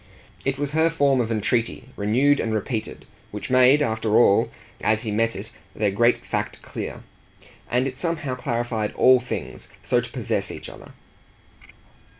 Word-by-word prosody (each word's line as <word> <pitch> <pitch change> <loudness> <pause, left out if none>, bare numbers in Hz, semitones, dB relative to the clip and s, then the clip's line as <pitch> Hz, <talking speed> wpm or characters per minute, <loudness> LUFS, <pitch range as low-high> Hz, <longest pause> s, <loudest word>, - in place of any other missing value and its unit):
It 135 0 -1
was 145 0 -2
her 160 +2 +3
form 140 -5 +2
of 115 -1 -2
entreaty 115 +3 -1
renewed 130 +8 +2
and 110 -1 -1
repeated, 110 +1 -4 0.2
which 105 +4 -6
made 130 +3 +6
after 110 -3 +1
all, 100 -4 +5 0.3
as 110 +2 +2
he 110 - -3
met 115 +2 +1
it, - - -7 0.2
their 105 -2 +1
great 120 +4 +2
fact - - -3
clear. - - -6 0.7
And 125 +2 +1
it 130 0 -7
somehow 165 -6 -2
clarified 120 -4 -2
ALL 130 0 +6
things 125 0 -6 0.2
so - - +2
to - - -8
possess - - -2
each - - -8
other. - - -13
120 Hz, 155 wpm, -23 LUFS, 110-135 Hz, 0.7 s, made